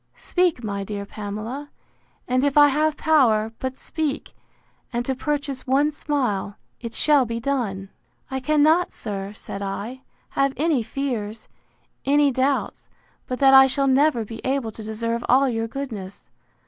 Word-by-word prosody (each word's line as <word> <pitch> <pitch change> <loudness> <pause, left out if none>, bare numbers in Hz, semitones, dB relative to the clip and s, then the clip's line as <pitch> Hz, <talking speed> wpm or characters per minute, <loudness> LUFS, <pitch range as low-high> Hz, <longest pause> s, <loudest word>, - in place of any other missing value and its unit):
—Speak, 355 -8 0
my 200 -2 -3
dear 200 0 -5
Pamela; 215 +8 -6 0.6
and 255 +1 +1
if 285 0 +1
I 290 0 +8
have 305 +2 +1
power, 230 -9 +3
but 260 0 -4
speak, 310 -3 -3 0.6
and 240 0 -2
to 265 - 0
purchase 280 -1 -3
one 280 +3 +3
smile, 250 -10 -2 0.2
it 230 -1 -7
shall 295 -3 +4
be 230 -1 -3
done! 225 -7 -2 0.4
I 265 - -1
cannot, 305 +5 +3
sir, 200 -2 -5
said 200 -1 -8
I, 205 +6 -5 0.3
have 275 0 +1
any 300 -3 +2
fears, 225 -4 -4 0.6
any 285 0 +3
doubts, 265 +2 -1 0.4
but 255 - -3
that 270 -1 +7
I 265 0 +9
shall 275 +1 0
never 270 -3 +3
be 225 +1 -8
able 260 -4 -1
to 220 - -11
deserve 230 +2 -2
all 270 +2 +5
your 225 -2 -1
goodness. 225 -7 -7
260 Hz, 150 wpm, -23 LUFS, 220-280 Hz, 0.6 s, I